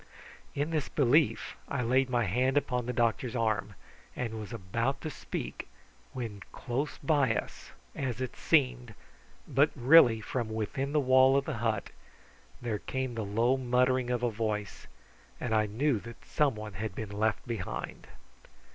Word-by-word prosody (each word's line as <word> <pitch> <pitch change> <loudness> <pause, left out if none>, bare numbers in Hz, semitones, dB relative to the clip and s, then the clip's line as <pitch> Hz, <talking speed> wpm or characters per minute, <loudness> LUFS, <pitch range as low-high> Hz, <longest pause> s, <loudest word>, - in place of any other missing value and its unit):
In 145 +3 -1
this 155 -4 -1
belief 145 +3 +2
I 140 -3 -2
laid 130 +3 +2
my 120 -1 +2
hand 130 +8 +1
upon 125 -4 0
the - - 0
doctor's 120 +1 0
arm, 110 -4 0 0.4
and 115 -3 -3
was 105 0 -7
about 115 +6 -2
to 155 - -4
speak, - - -6 0.4
when 110 -5 -5
close 135 +4 -3
by 135 -6 +2
us, - - -5 0.3
as 125 -3 -3
it 130 -2 -4
seemed, 60 -1 +1 0.5
but 140 +3 +4
really 125 -3 +7
from 115 +1 -3
within 110 +6 -2
the 150 - +3
wall 130 0 +5
of 140 - 0
the 150 -6 -3
hut, 115 -2 -1 0.7
there 110 -3 -2
came 130 -2 -3
the 115 -1 -3
low 115 +6 +2
muttering 125 0 +2
of 125 -1 -1
a 120 - +2
voice, 105 -2 -3 0.5
and 120 - -2
I 110 -1 +3
knew 120 +3 +1
that 115 +2 -12
some 145 -5 +1
one 105 -1 -7
had 110 -4 -4
been 110 -2 -5
left 105 +2 -1
behind. 110 -6 -5
120 Hz, 160 wpm, -30 LUFS, 110-130 Hz, 0.7 s, really